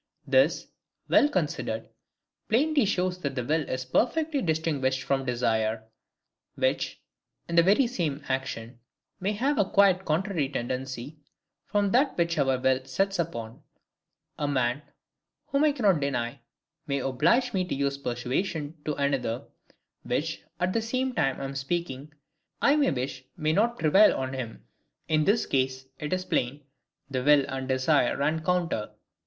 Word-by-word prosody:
This, - - +3 0.4
well 290 - +5
considered, - - -2 0.6
plainly 285 +3 +3
shows 185 -2 0
that 140 -5 -3
the 125 - -1
will 155 +3 0
is 130 0 -3
perfectly 290 - +1
distinguished 150 - 0
from 135 0 0
desire; 110 -2 0 0.7
which, - - 0 0.5
in 170 - -3
the 170 - +8
very 200 +10 +4
same 160 - -2
action, 125 -3 -3 0.4
may 195 +3 0
have 265 +7 0
a 195 - +2
quite 195 -2 +4
contrary 165 -3 0
tendency 130 +2 -4 0.5
from 205 -2 +1
that 270 +5 +2
which 170 -2 +1
our 135 -2 +2
will 130 0 +2
sets 195 +8 -1
us 170 - +2
upon. 115 -7 -8 0.8
A 145 - 0
man, 130 -1 0 0.7
whom 280 +2 +3
I 300 - +5
cannot 210 - +2
deny, 120 -4 -2 0.5
may 140 -1 0
oblige 160 - +2
me 185 - +1
to - - -3
use 140 0 -1
persuasions 140 +5 -2
to 150 - -1
another, 135 -4 -1 0.6
which, - - -2 0.2
at 185 +1 0
the 230 - +1
same 255 +3 -1
time 135 - 0
I - - -5
am 135 0 -4
speaking, 140 0 -3 0.5
I 280 - +4
may 290 -3 +3
wish 130 0 -3
may 155 -1 +1
not 235 +6 +2
prevail 180 +7 +5
on 130 0 -3
him. 125 -4 -6 0.4
In 155 -1 +2
this 220 +3 +3
case, 130 0 -1
it 150 -1 -4
is 185 0 -1
plain 140 +1 -1 0.4
the 130 -2 -2
will 145 -1 +5
and 135 -1 -4
desire 130 0 +2
run 155 +3 0
counter. 175 -11 0
150 Hz, 155 wpm, -27 LUFS, 130-195 Hz, 0.8 s, the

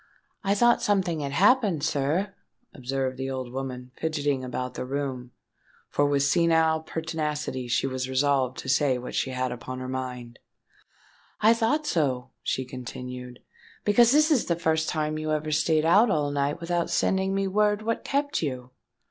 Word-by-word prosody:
"I 200 +1 +2
thought 240 +3 +4
something 185 -5 +1
had 140 -1 -3
happened, 200 - +3
sir," 155 +8 0 0.4
observed 130 0 -3
the 135 0 -2
old 130 -2 -5
woman, 130 -1 -5
fidgetting 145 -4 -1
about 125 0 -4
the - - -4
room, 130 -2 -4 0.6
for 145 - +2
with 140 -1 +2
senile 160 +1 +3
pertinacity 155 -5 -3
she 120 - +1
was 130 -1 -3
resolved 130 -1 +1
to - - -7
say 135 -1 +2
what 125 0 -7
she - - 0
had 130 -1 -2
upon 125 +1 -6
her 130 0 -5
mind: 125 -2 -5 1.0
"I 220 +2 +6
thought 240 +7 0
so," 130 - 0
she 130 - -2
continued, 125 0 -8 0.4
"because 230 +3 +5
this 305 +3 +4
is 270 -7 +3
the 170 - +1
first 160 -1 0
time 155 0 -1
you 155 0 -2
ever 155 0 -2
stayed 155 +1 +2
out 205 +8 +5
all 150 -5 +1
night 145 +2 -1
without 170 0 -1
sending 190 0 +1
me 195 0 0
word 210 +2 +1
what 230 +1 -2
kept 285 +1 -1
you." 130 -4 -4
145 Hz, 165 wpm, -26 LUFS, 130-175 Hz, 1.0 s, I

